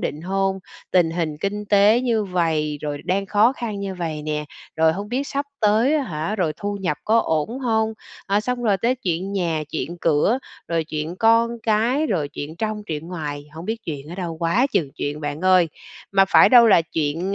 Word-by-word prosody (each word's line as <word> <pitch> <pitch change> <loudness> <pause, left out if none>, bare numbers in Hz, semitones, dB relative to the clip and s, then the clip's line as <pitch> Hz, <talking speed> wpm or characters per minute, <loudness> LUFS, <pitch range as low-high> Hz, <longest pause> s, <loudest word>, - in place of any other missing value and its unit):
định 150 - -3
hông, 195 +1 0 0.3
tình 175 -3 +3
hình 165 -3 -2
kinh 205 +1 -2
tế 205 +3 +4
như 230 -4 +1
vầy, 160 -5 0
rồi 145 -1 -3
đang 195 +2 0
khó 215 +5 +4
khăn 220 -6 -5
như 195 -1 -4
vầy 160 -4 -4
nè, 150 0 -2 0.3
rồi 160 0 +4
hông 200 +4 -5
biết 265 +4 -2
sắp 280 +1 -2
tới, 225 +7 +3
á 300 - +2
hả, 170 - -3
rồi 170 -5 0
thu 205 +4 -3
nhập 175 -5 -1
có 225 +2 +4
ổn 160 - -1
hông, 220 -3 0 0.3
ờ, 200 +1 +2
xong 250 +2 -3
rồi 210 -4 +3
tới 235 +6 +1
chuyện 190 -3 -3
nhà, 170 -5 -1
chuyện 170 +2 -4
cửa, 165 - +2 0.3
rồi 165 -1 0
chuyện 155 +2 -4
con 230 +2 +4
cái, 235 +8 +2
rồi 160 - -1
chuyện 150 +3 -7
trong, 215 +2 -3
truyện 160 +1 -5
ngoài, 145 -5 -5
hổng 165 +2 -8
biết 225 +3 -2
chuyện 145 -2 -6
ở 175 - -6
đâu 175 -4 -4
quá 170 +10 +2
chừng 145 -5 +1
chuyện 145 +1 -3
bạn 145 +1 -4
ơi. 185 -2 +4 0.4
Mà 195 0 +5
phải - - +7
đâu 240 -2 +8
là 195 -6 +6
chuyện, 165 +4 -2
185 Hz, 210 wpm, -22 LUFS, 160-220 Hz, 0.4 s, đâu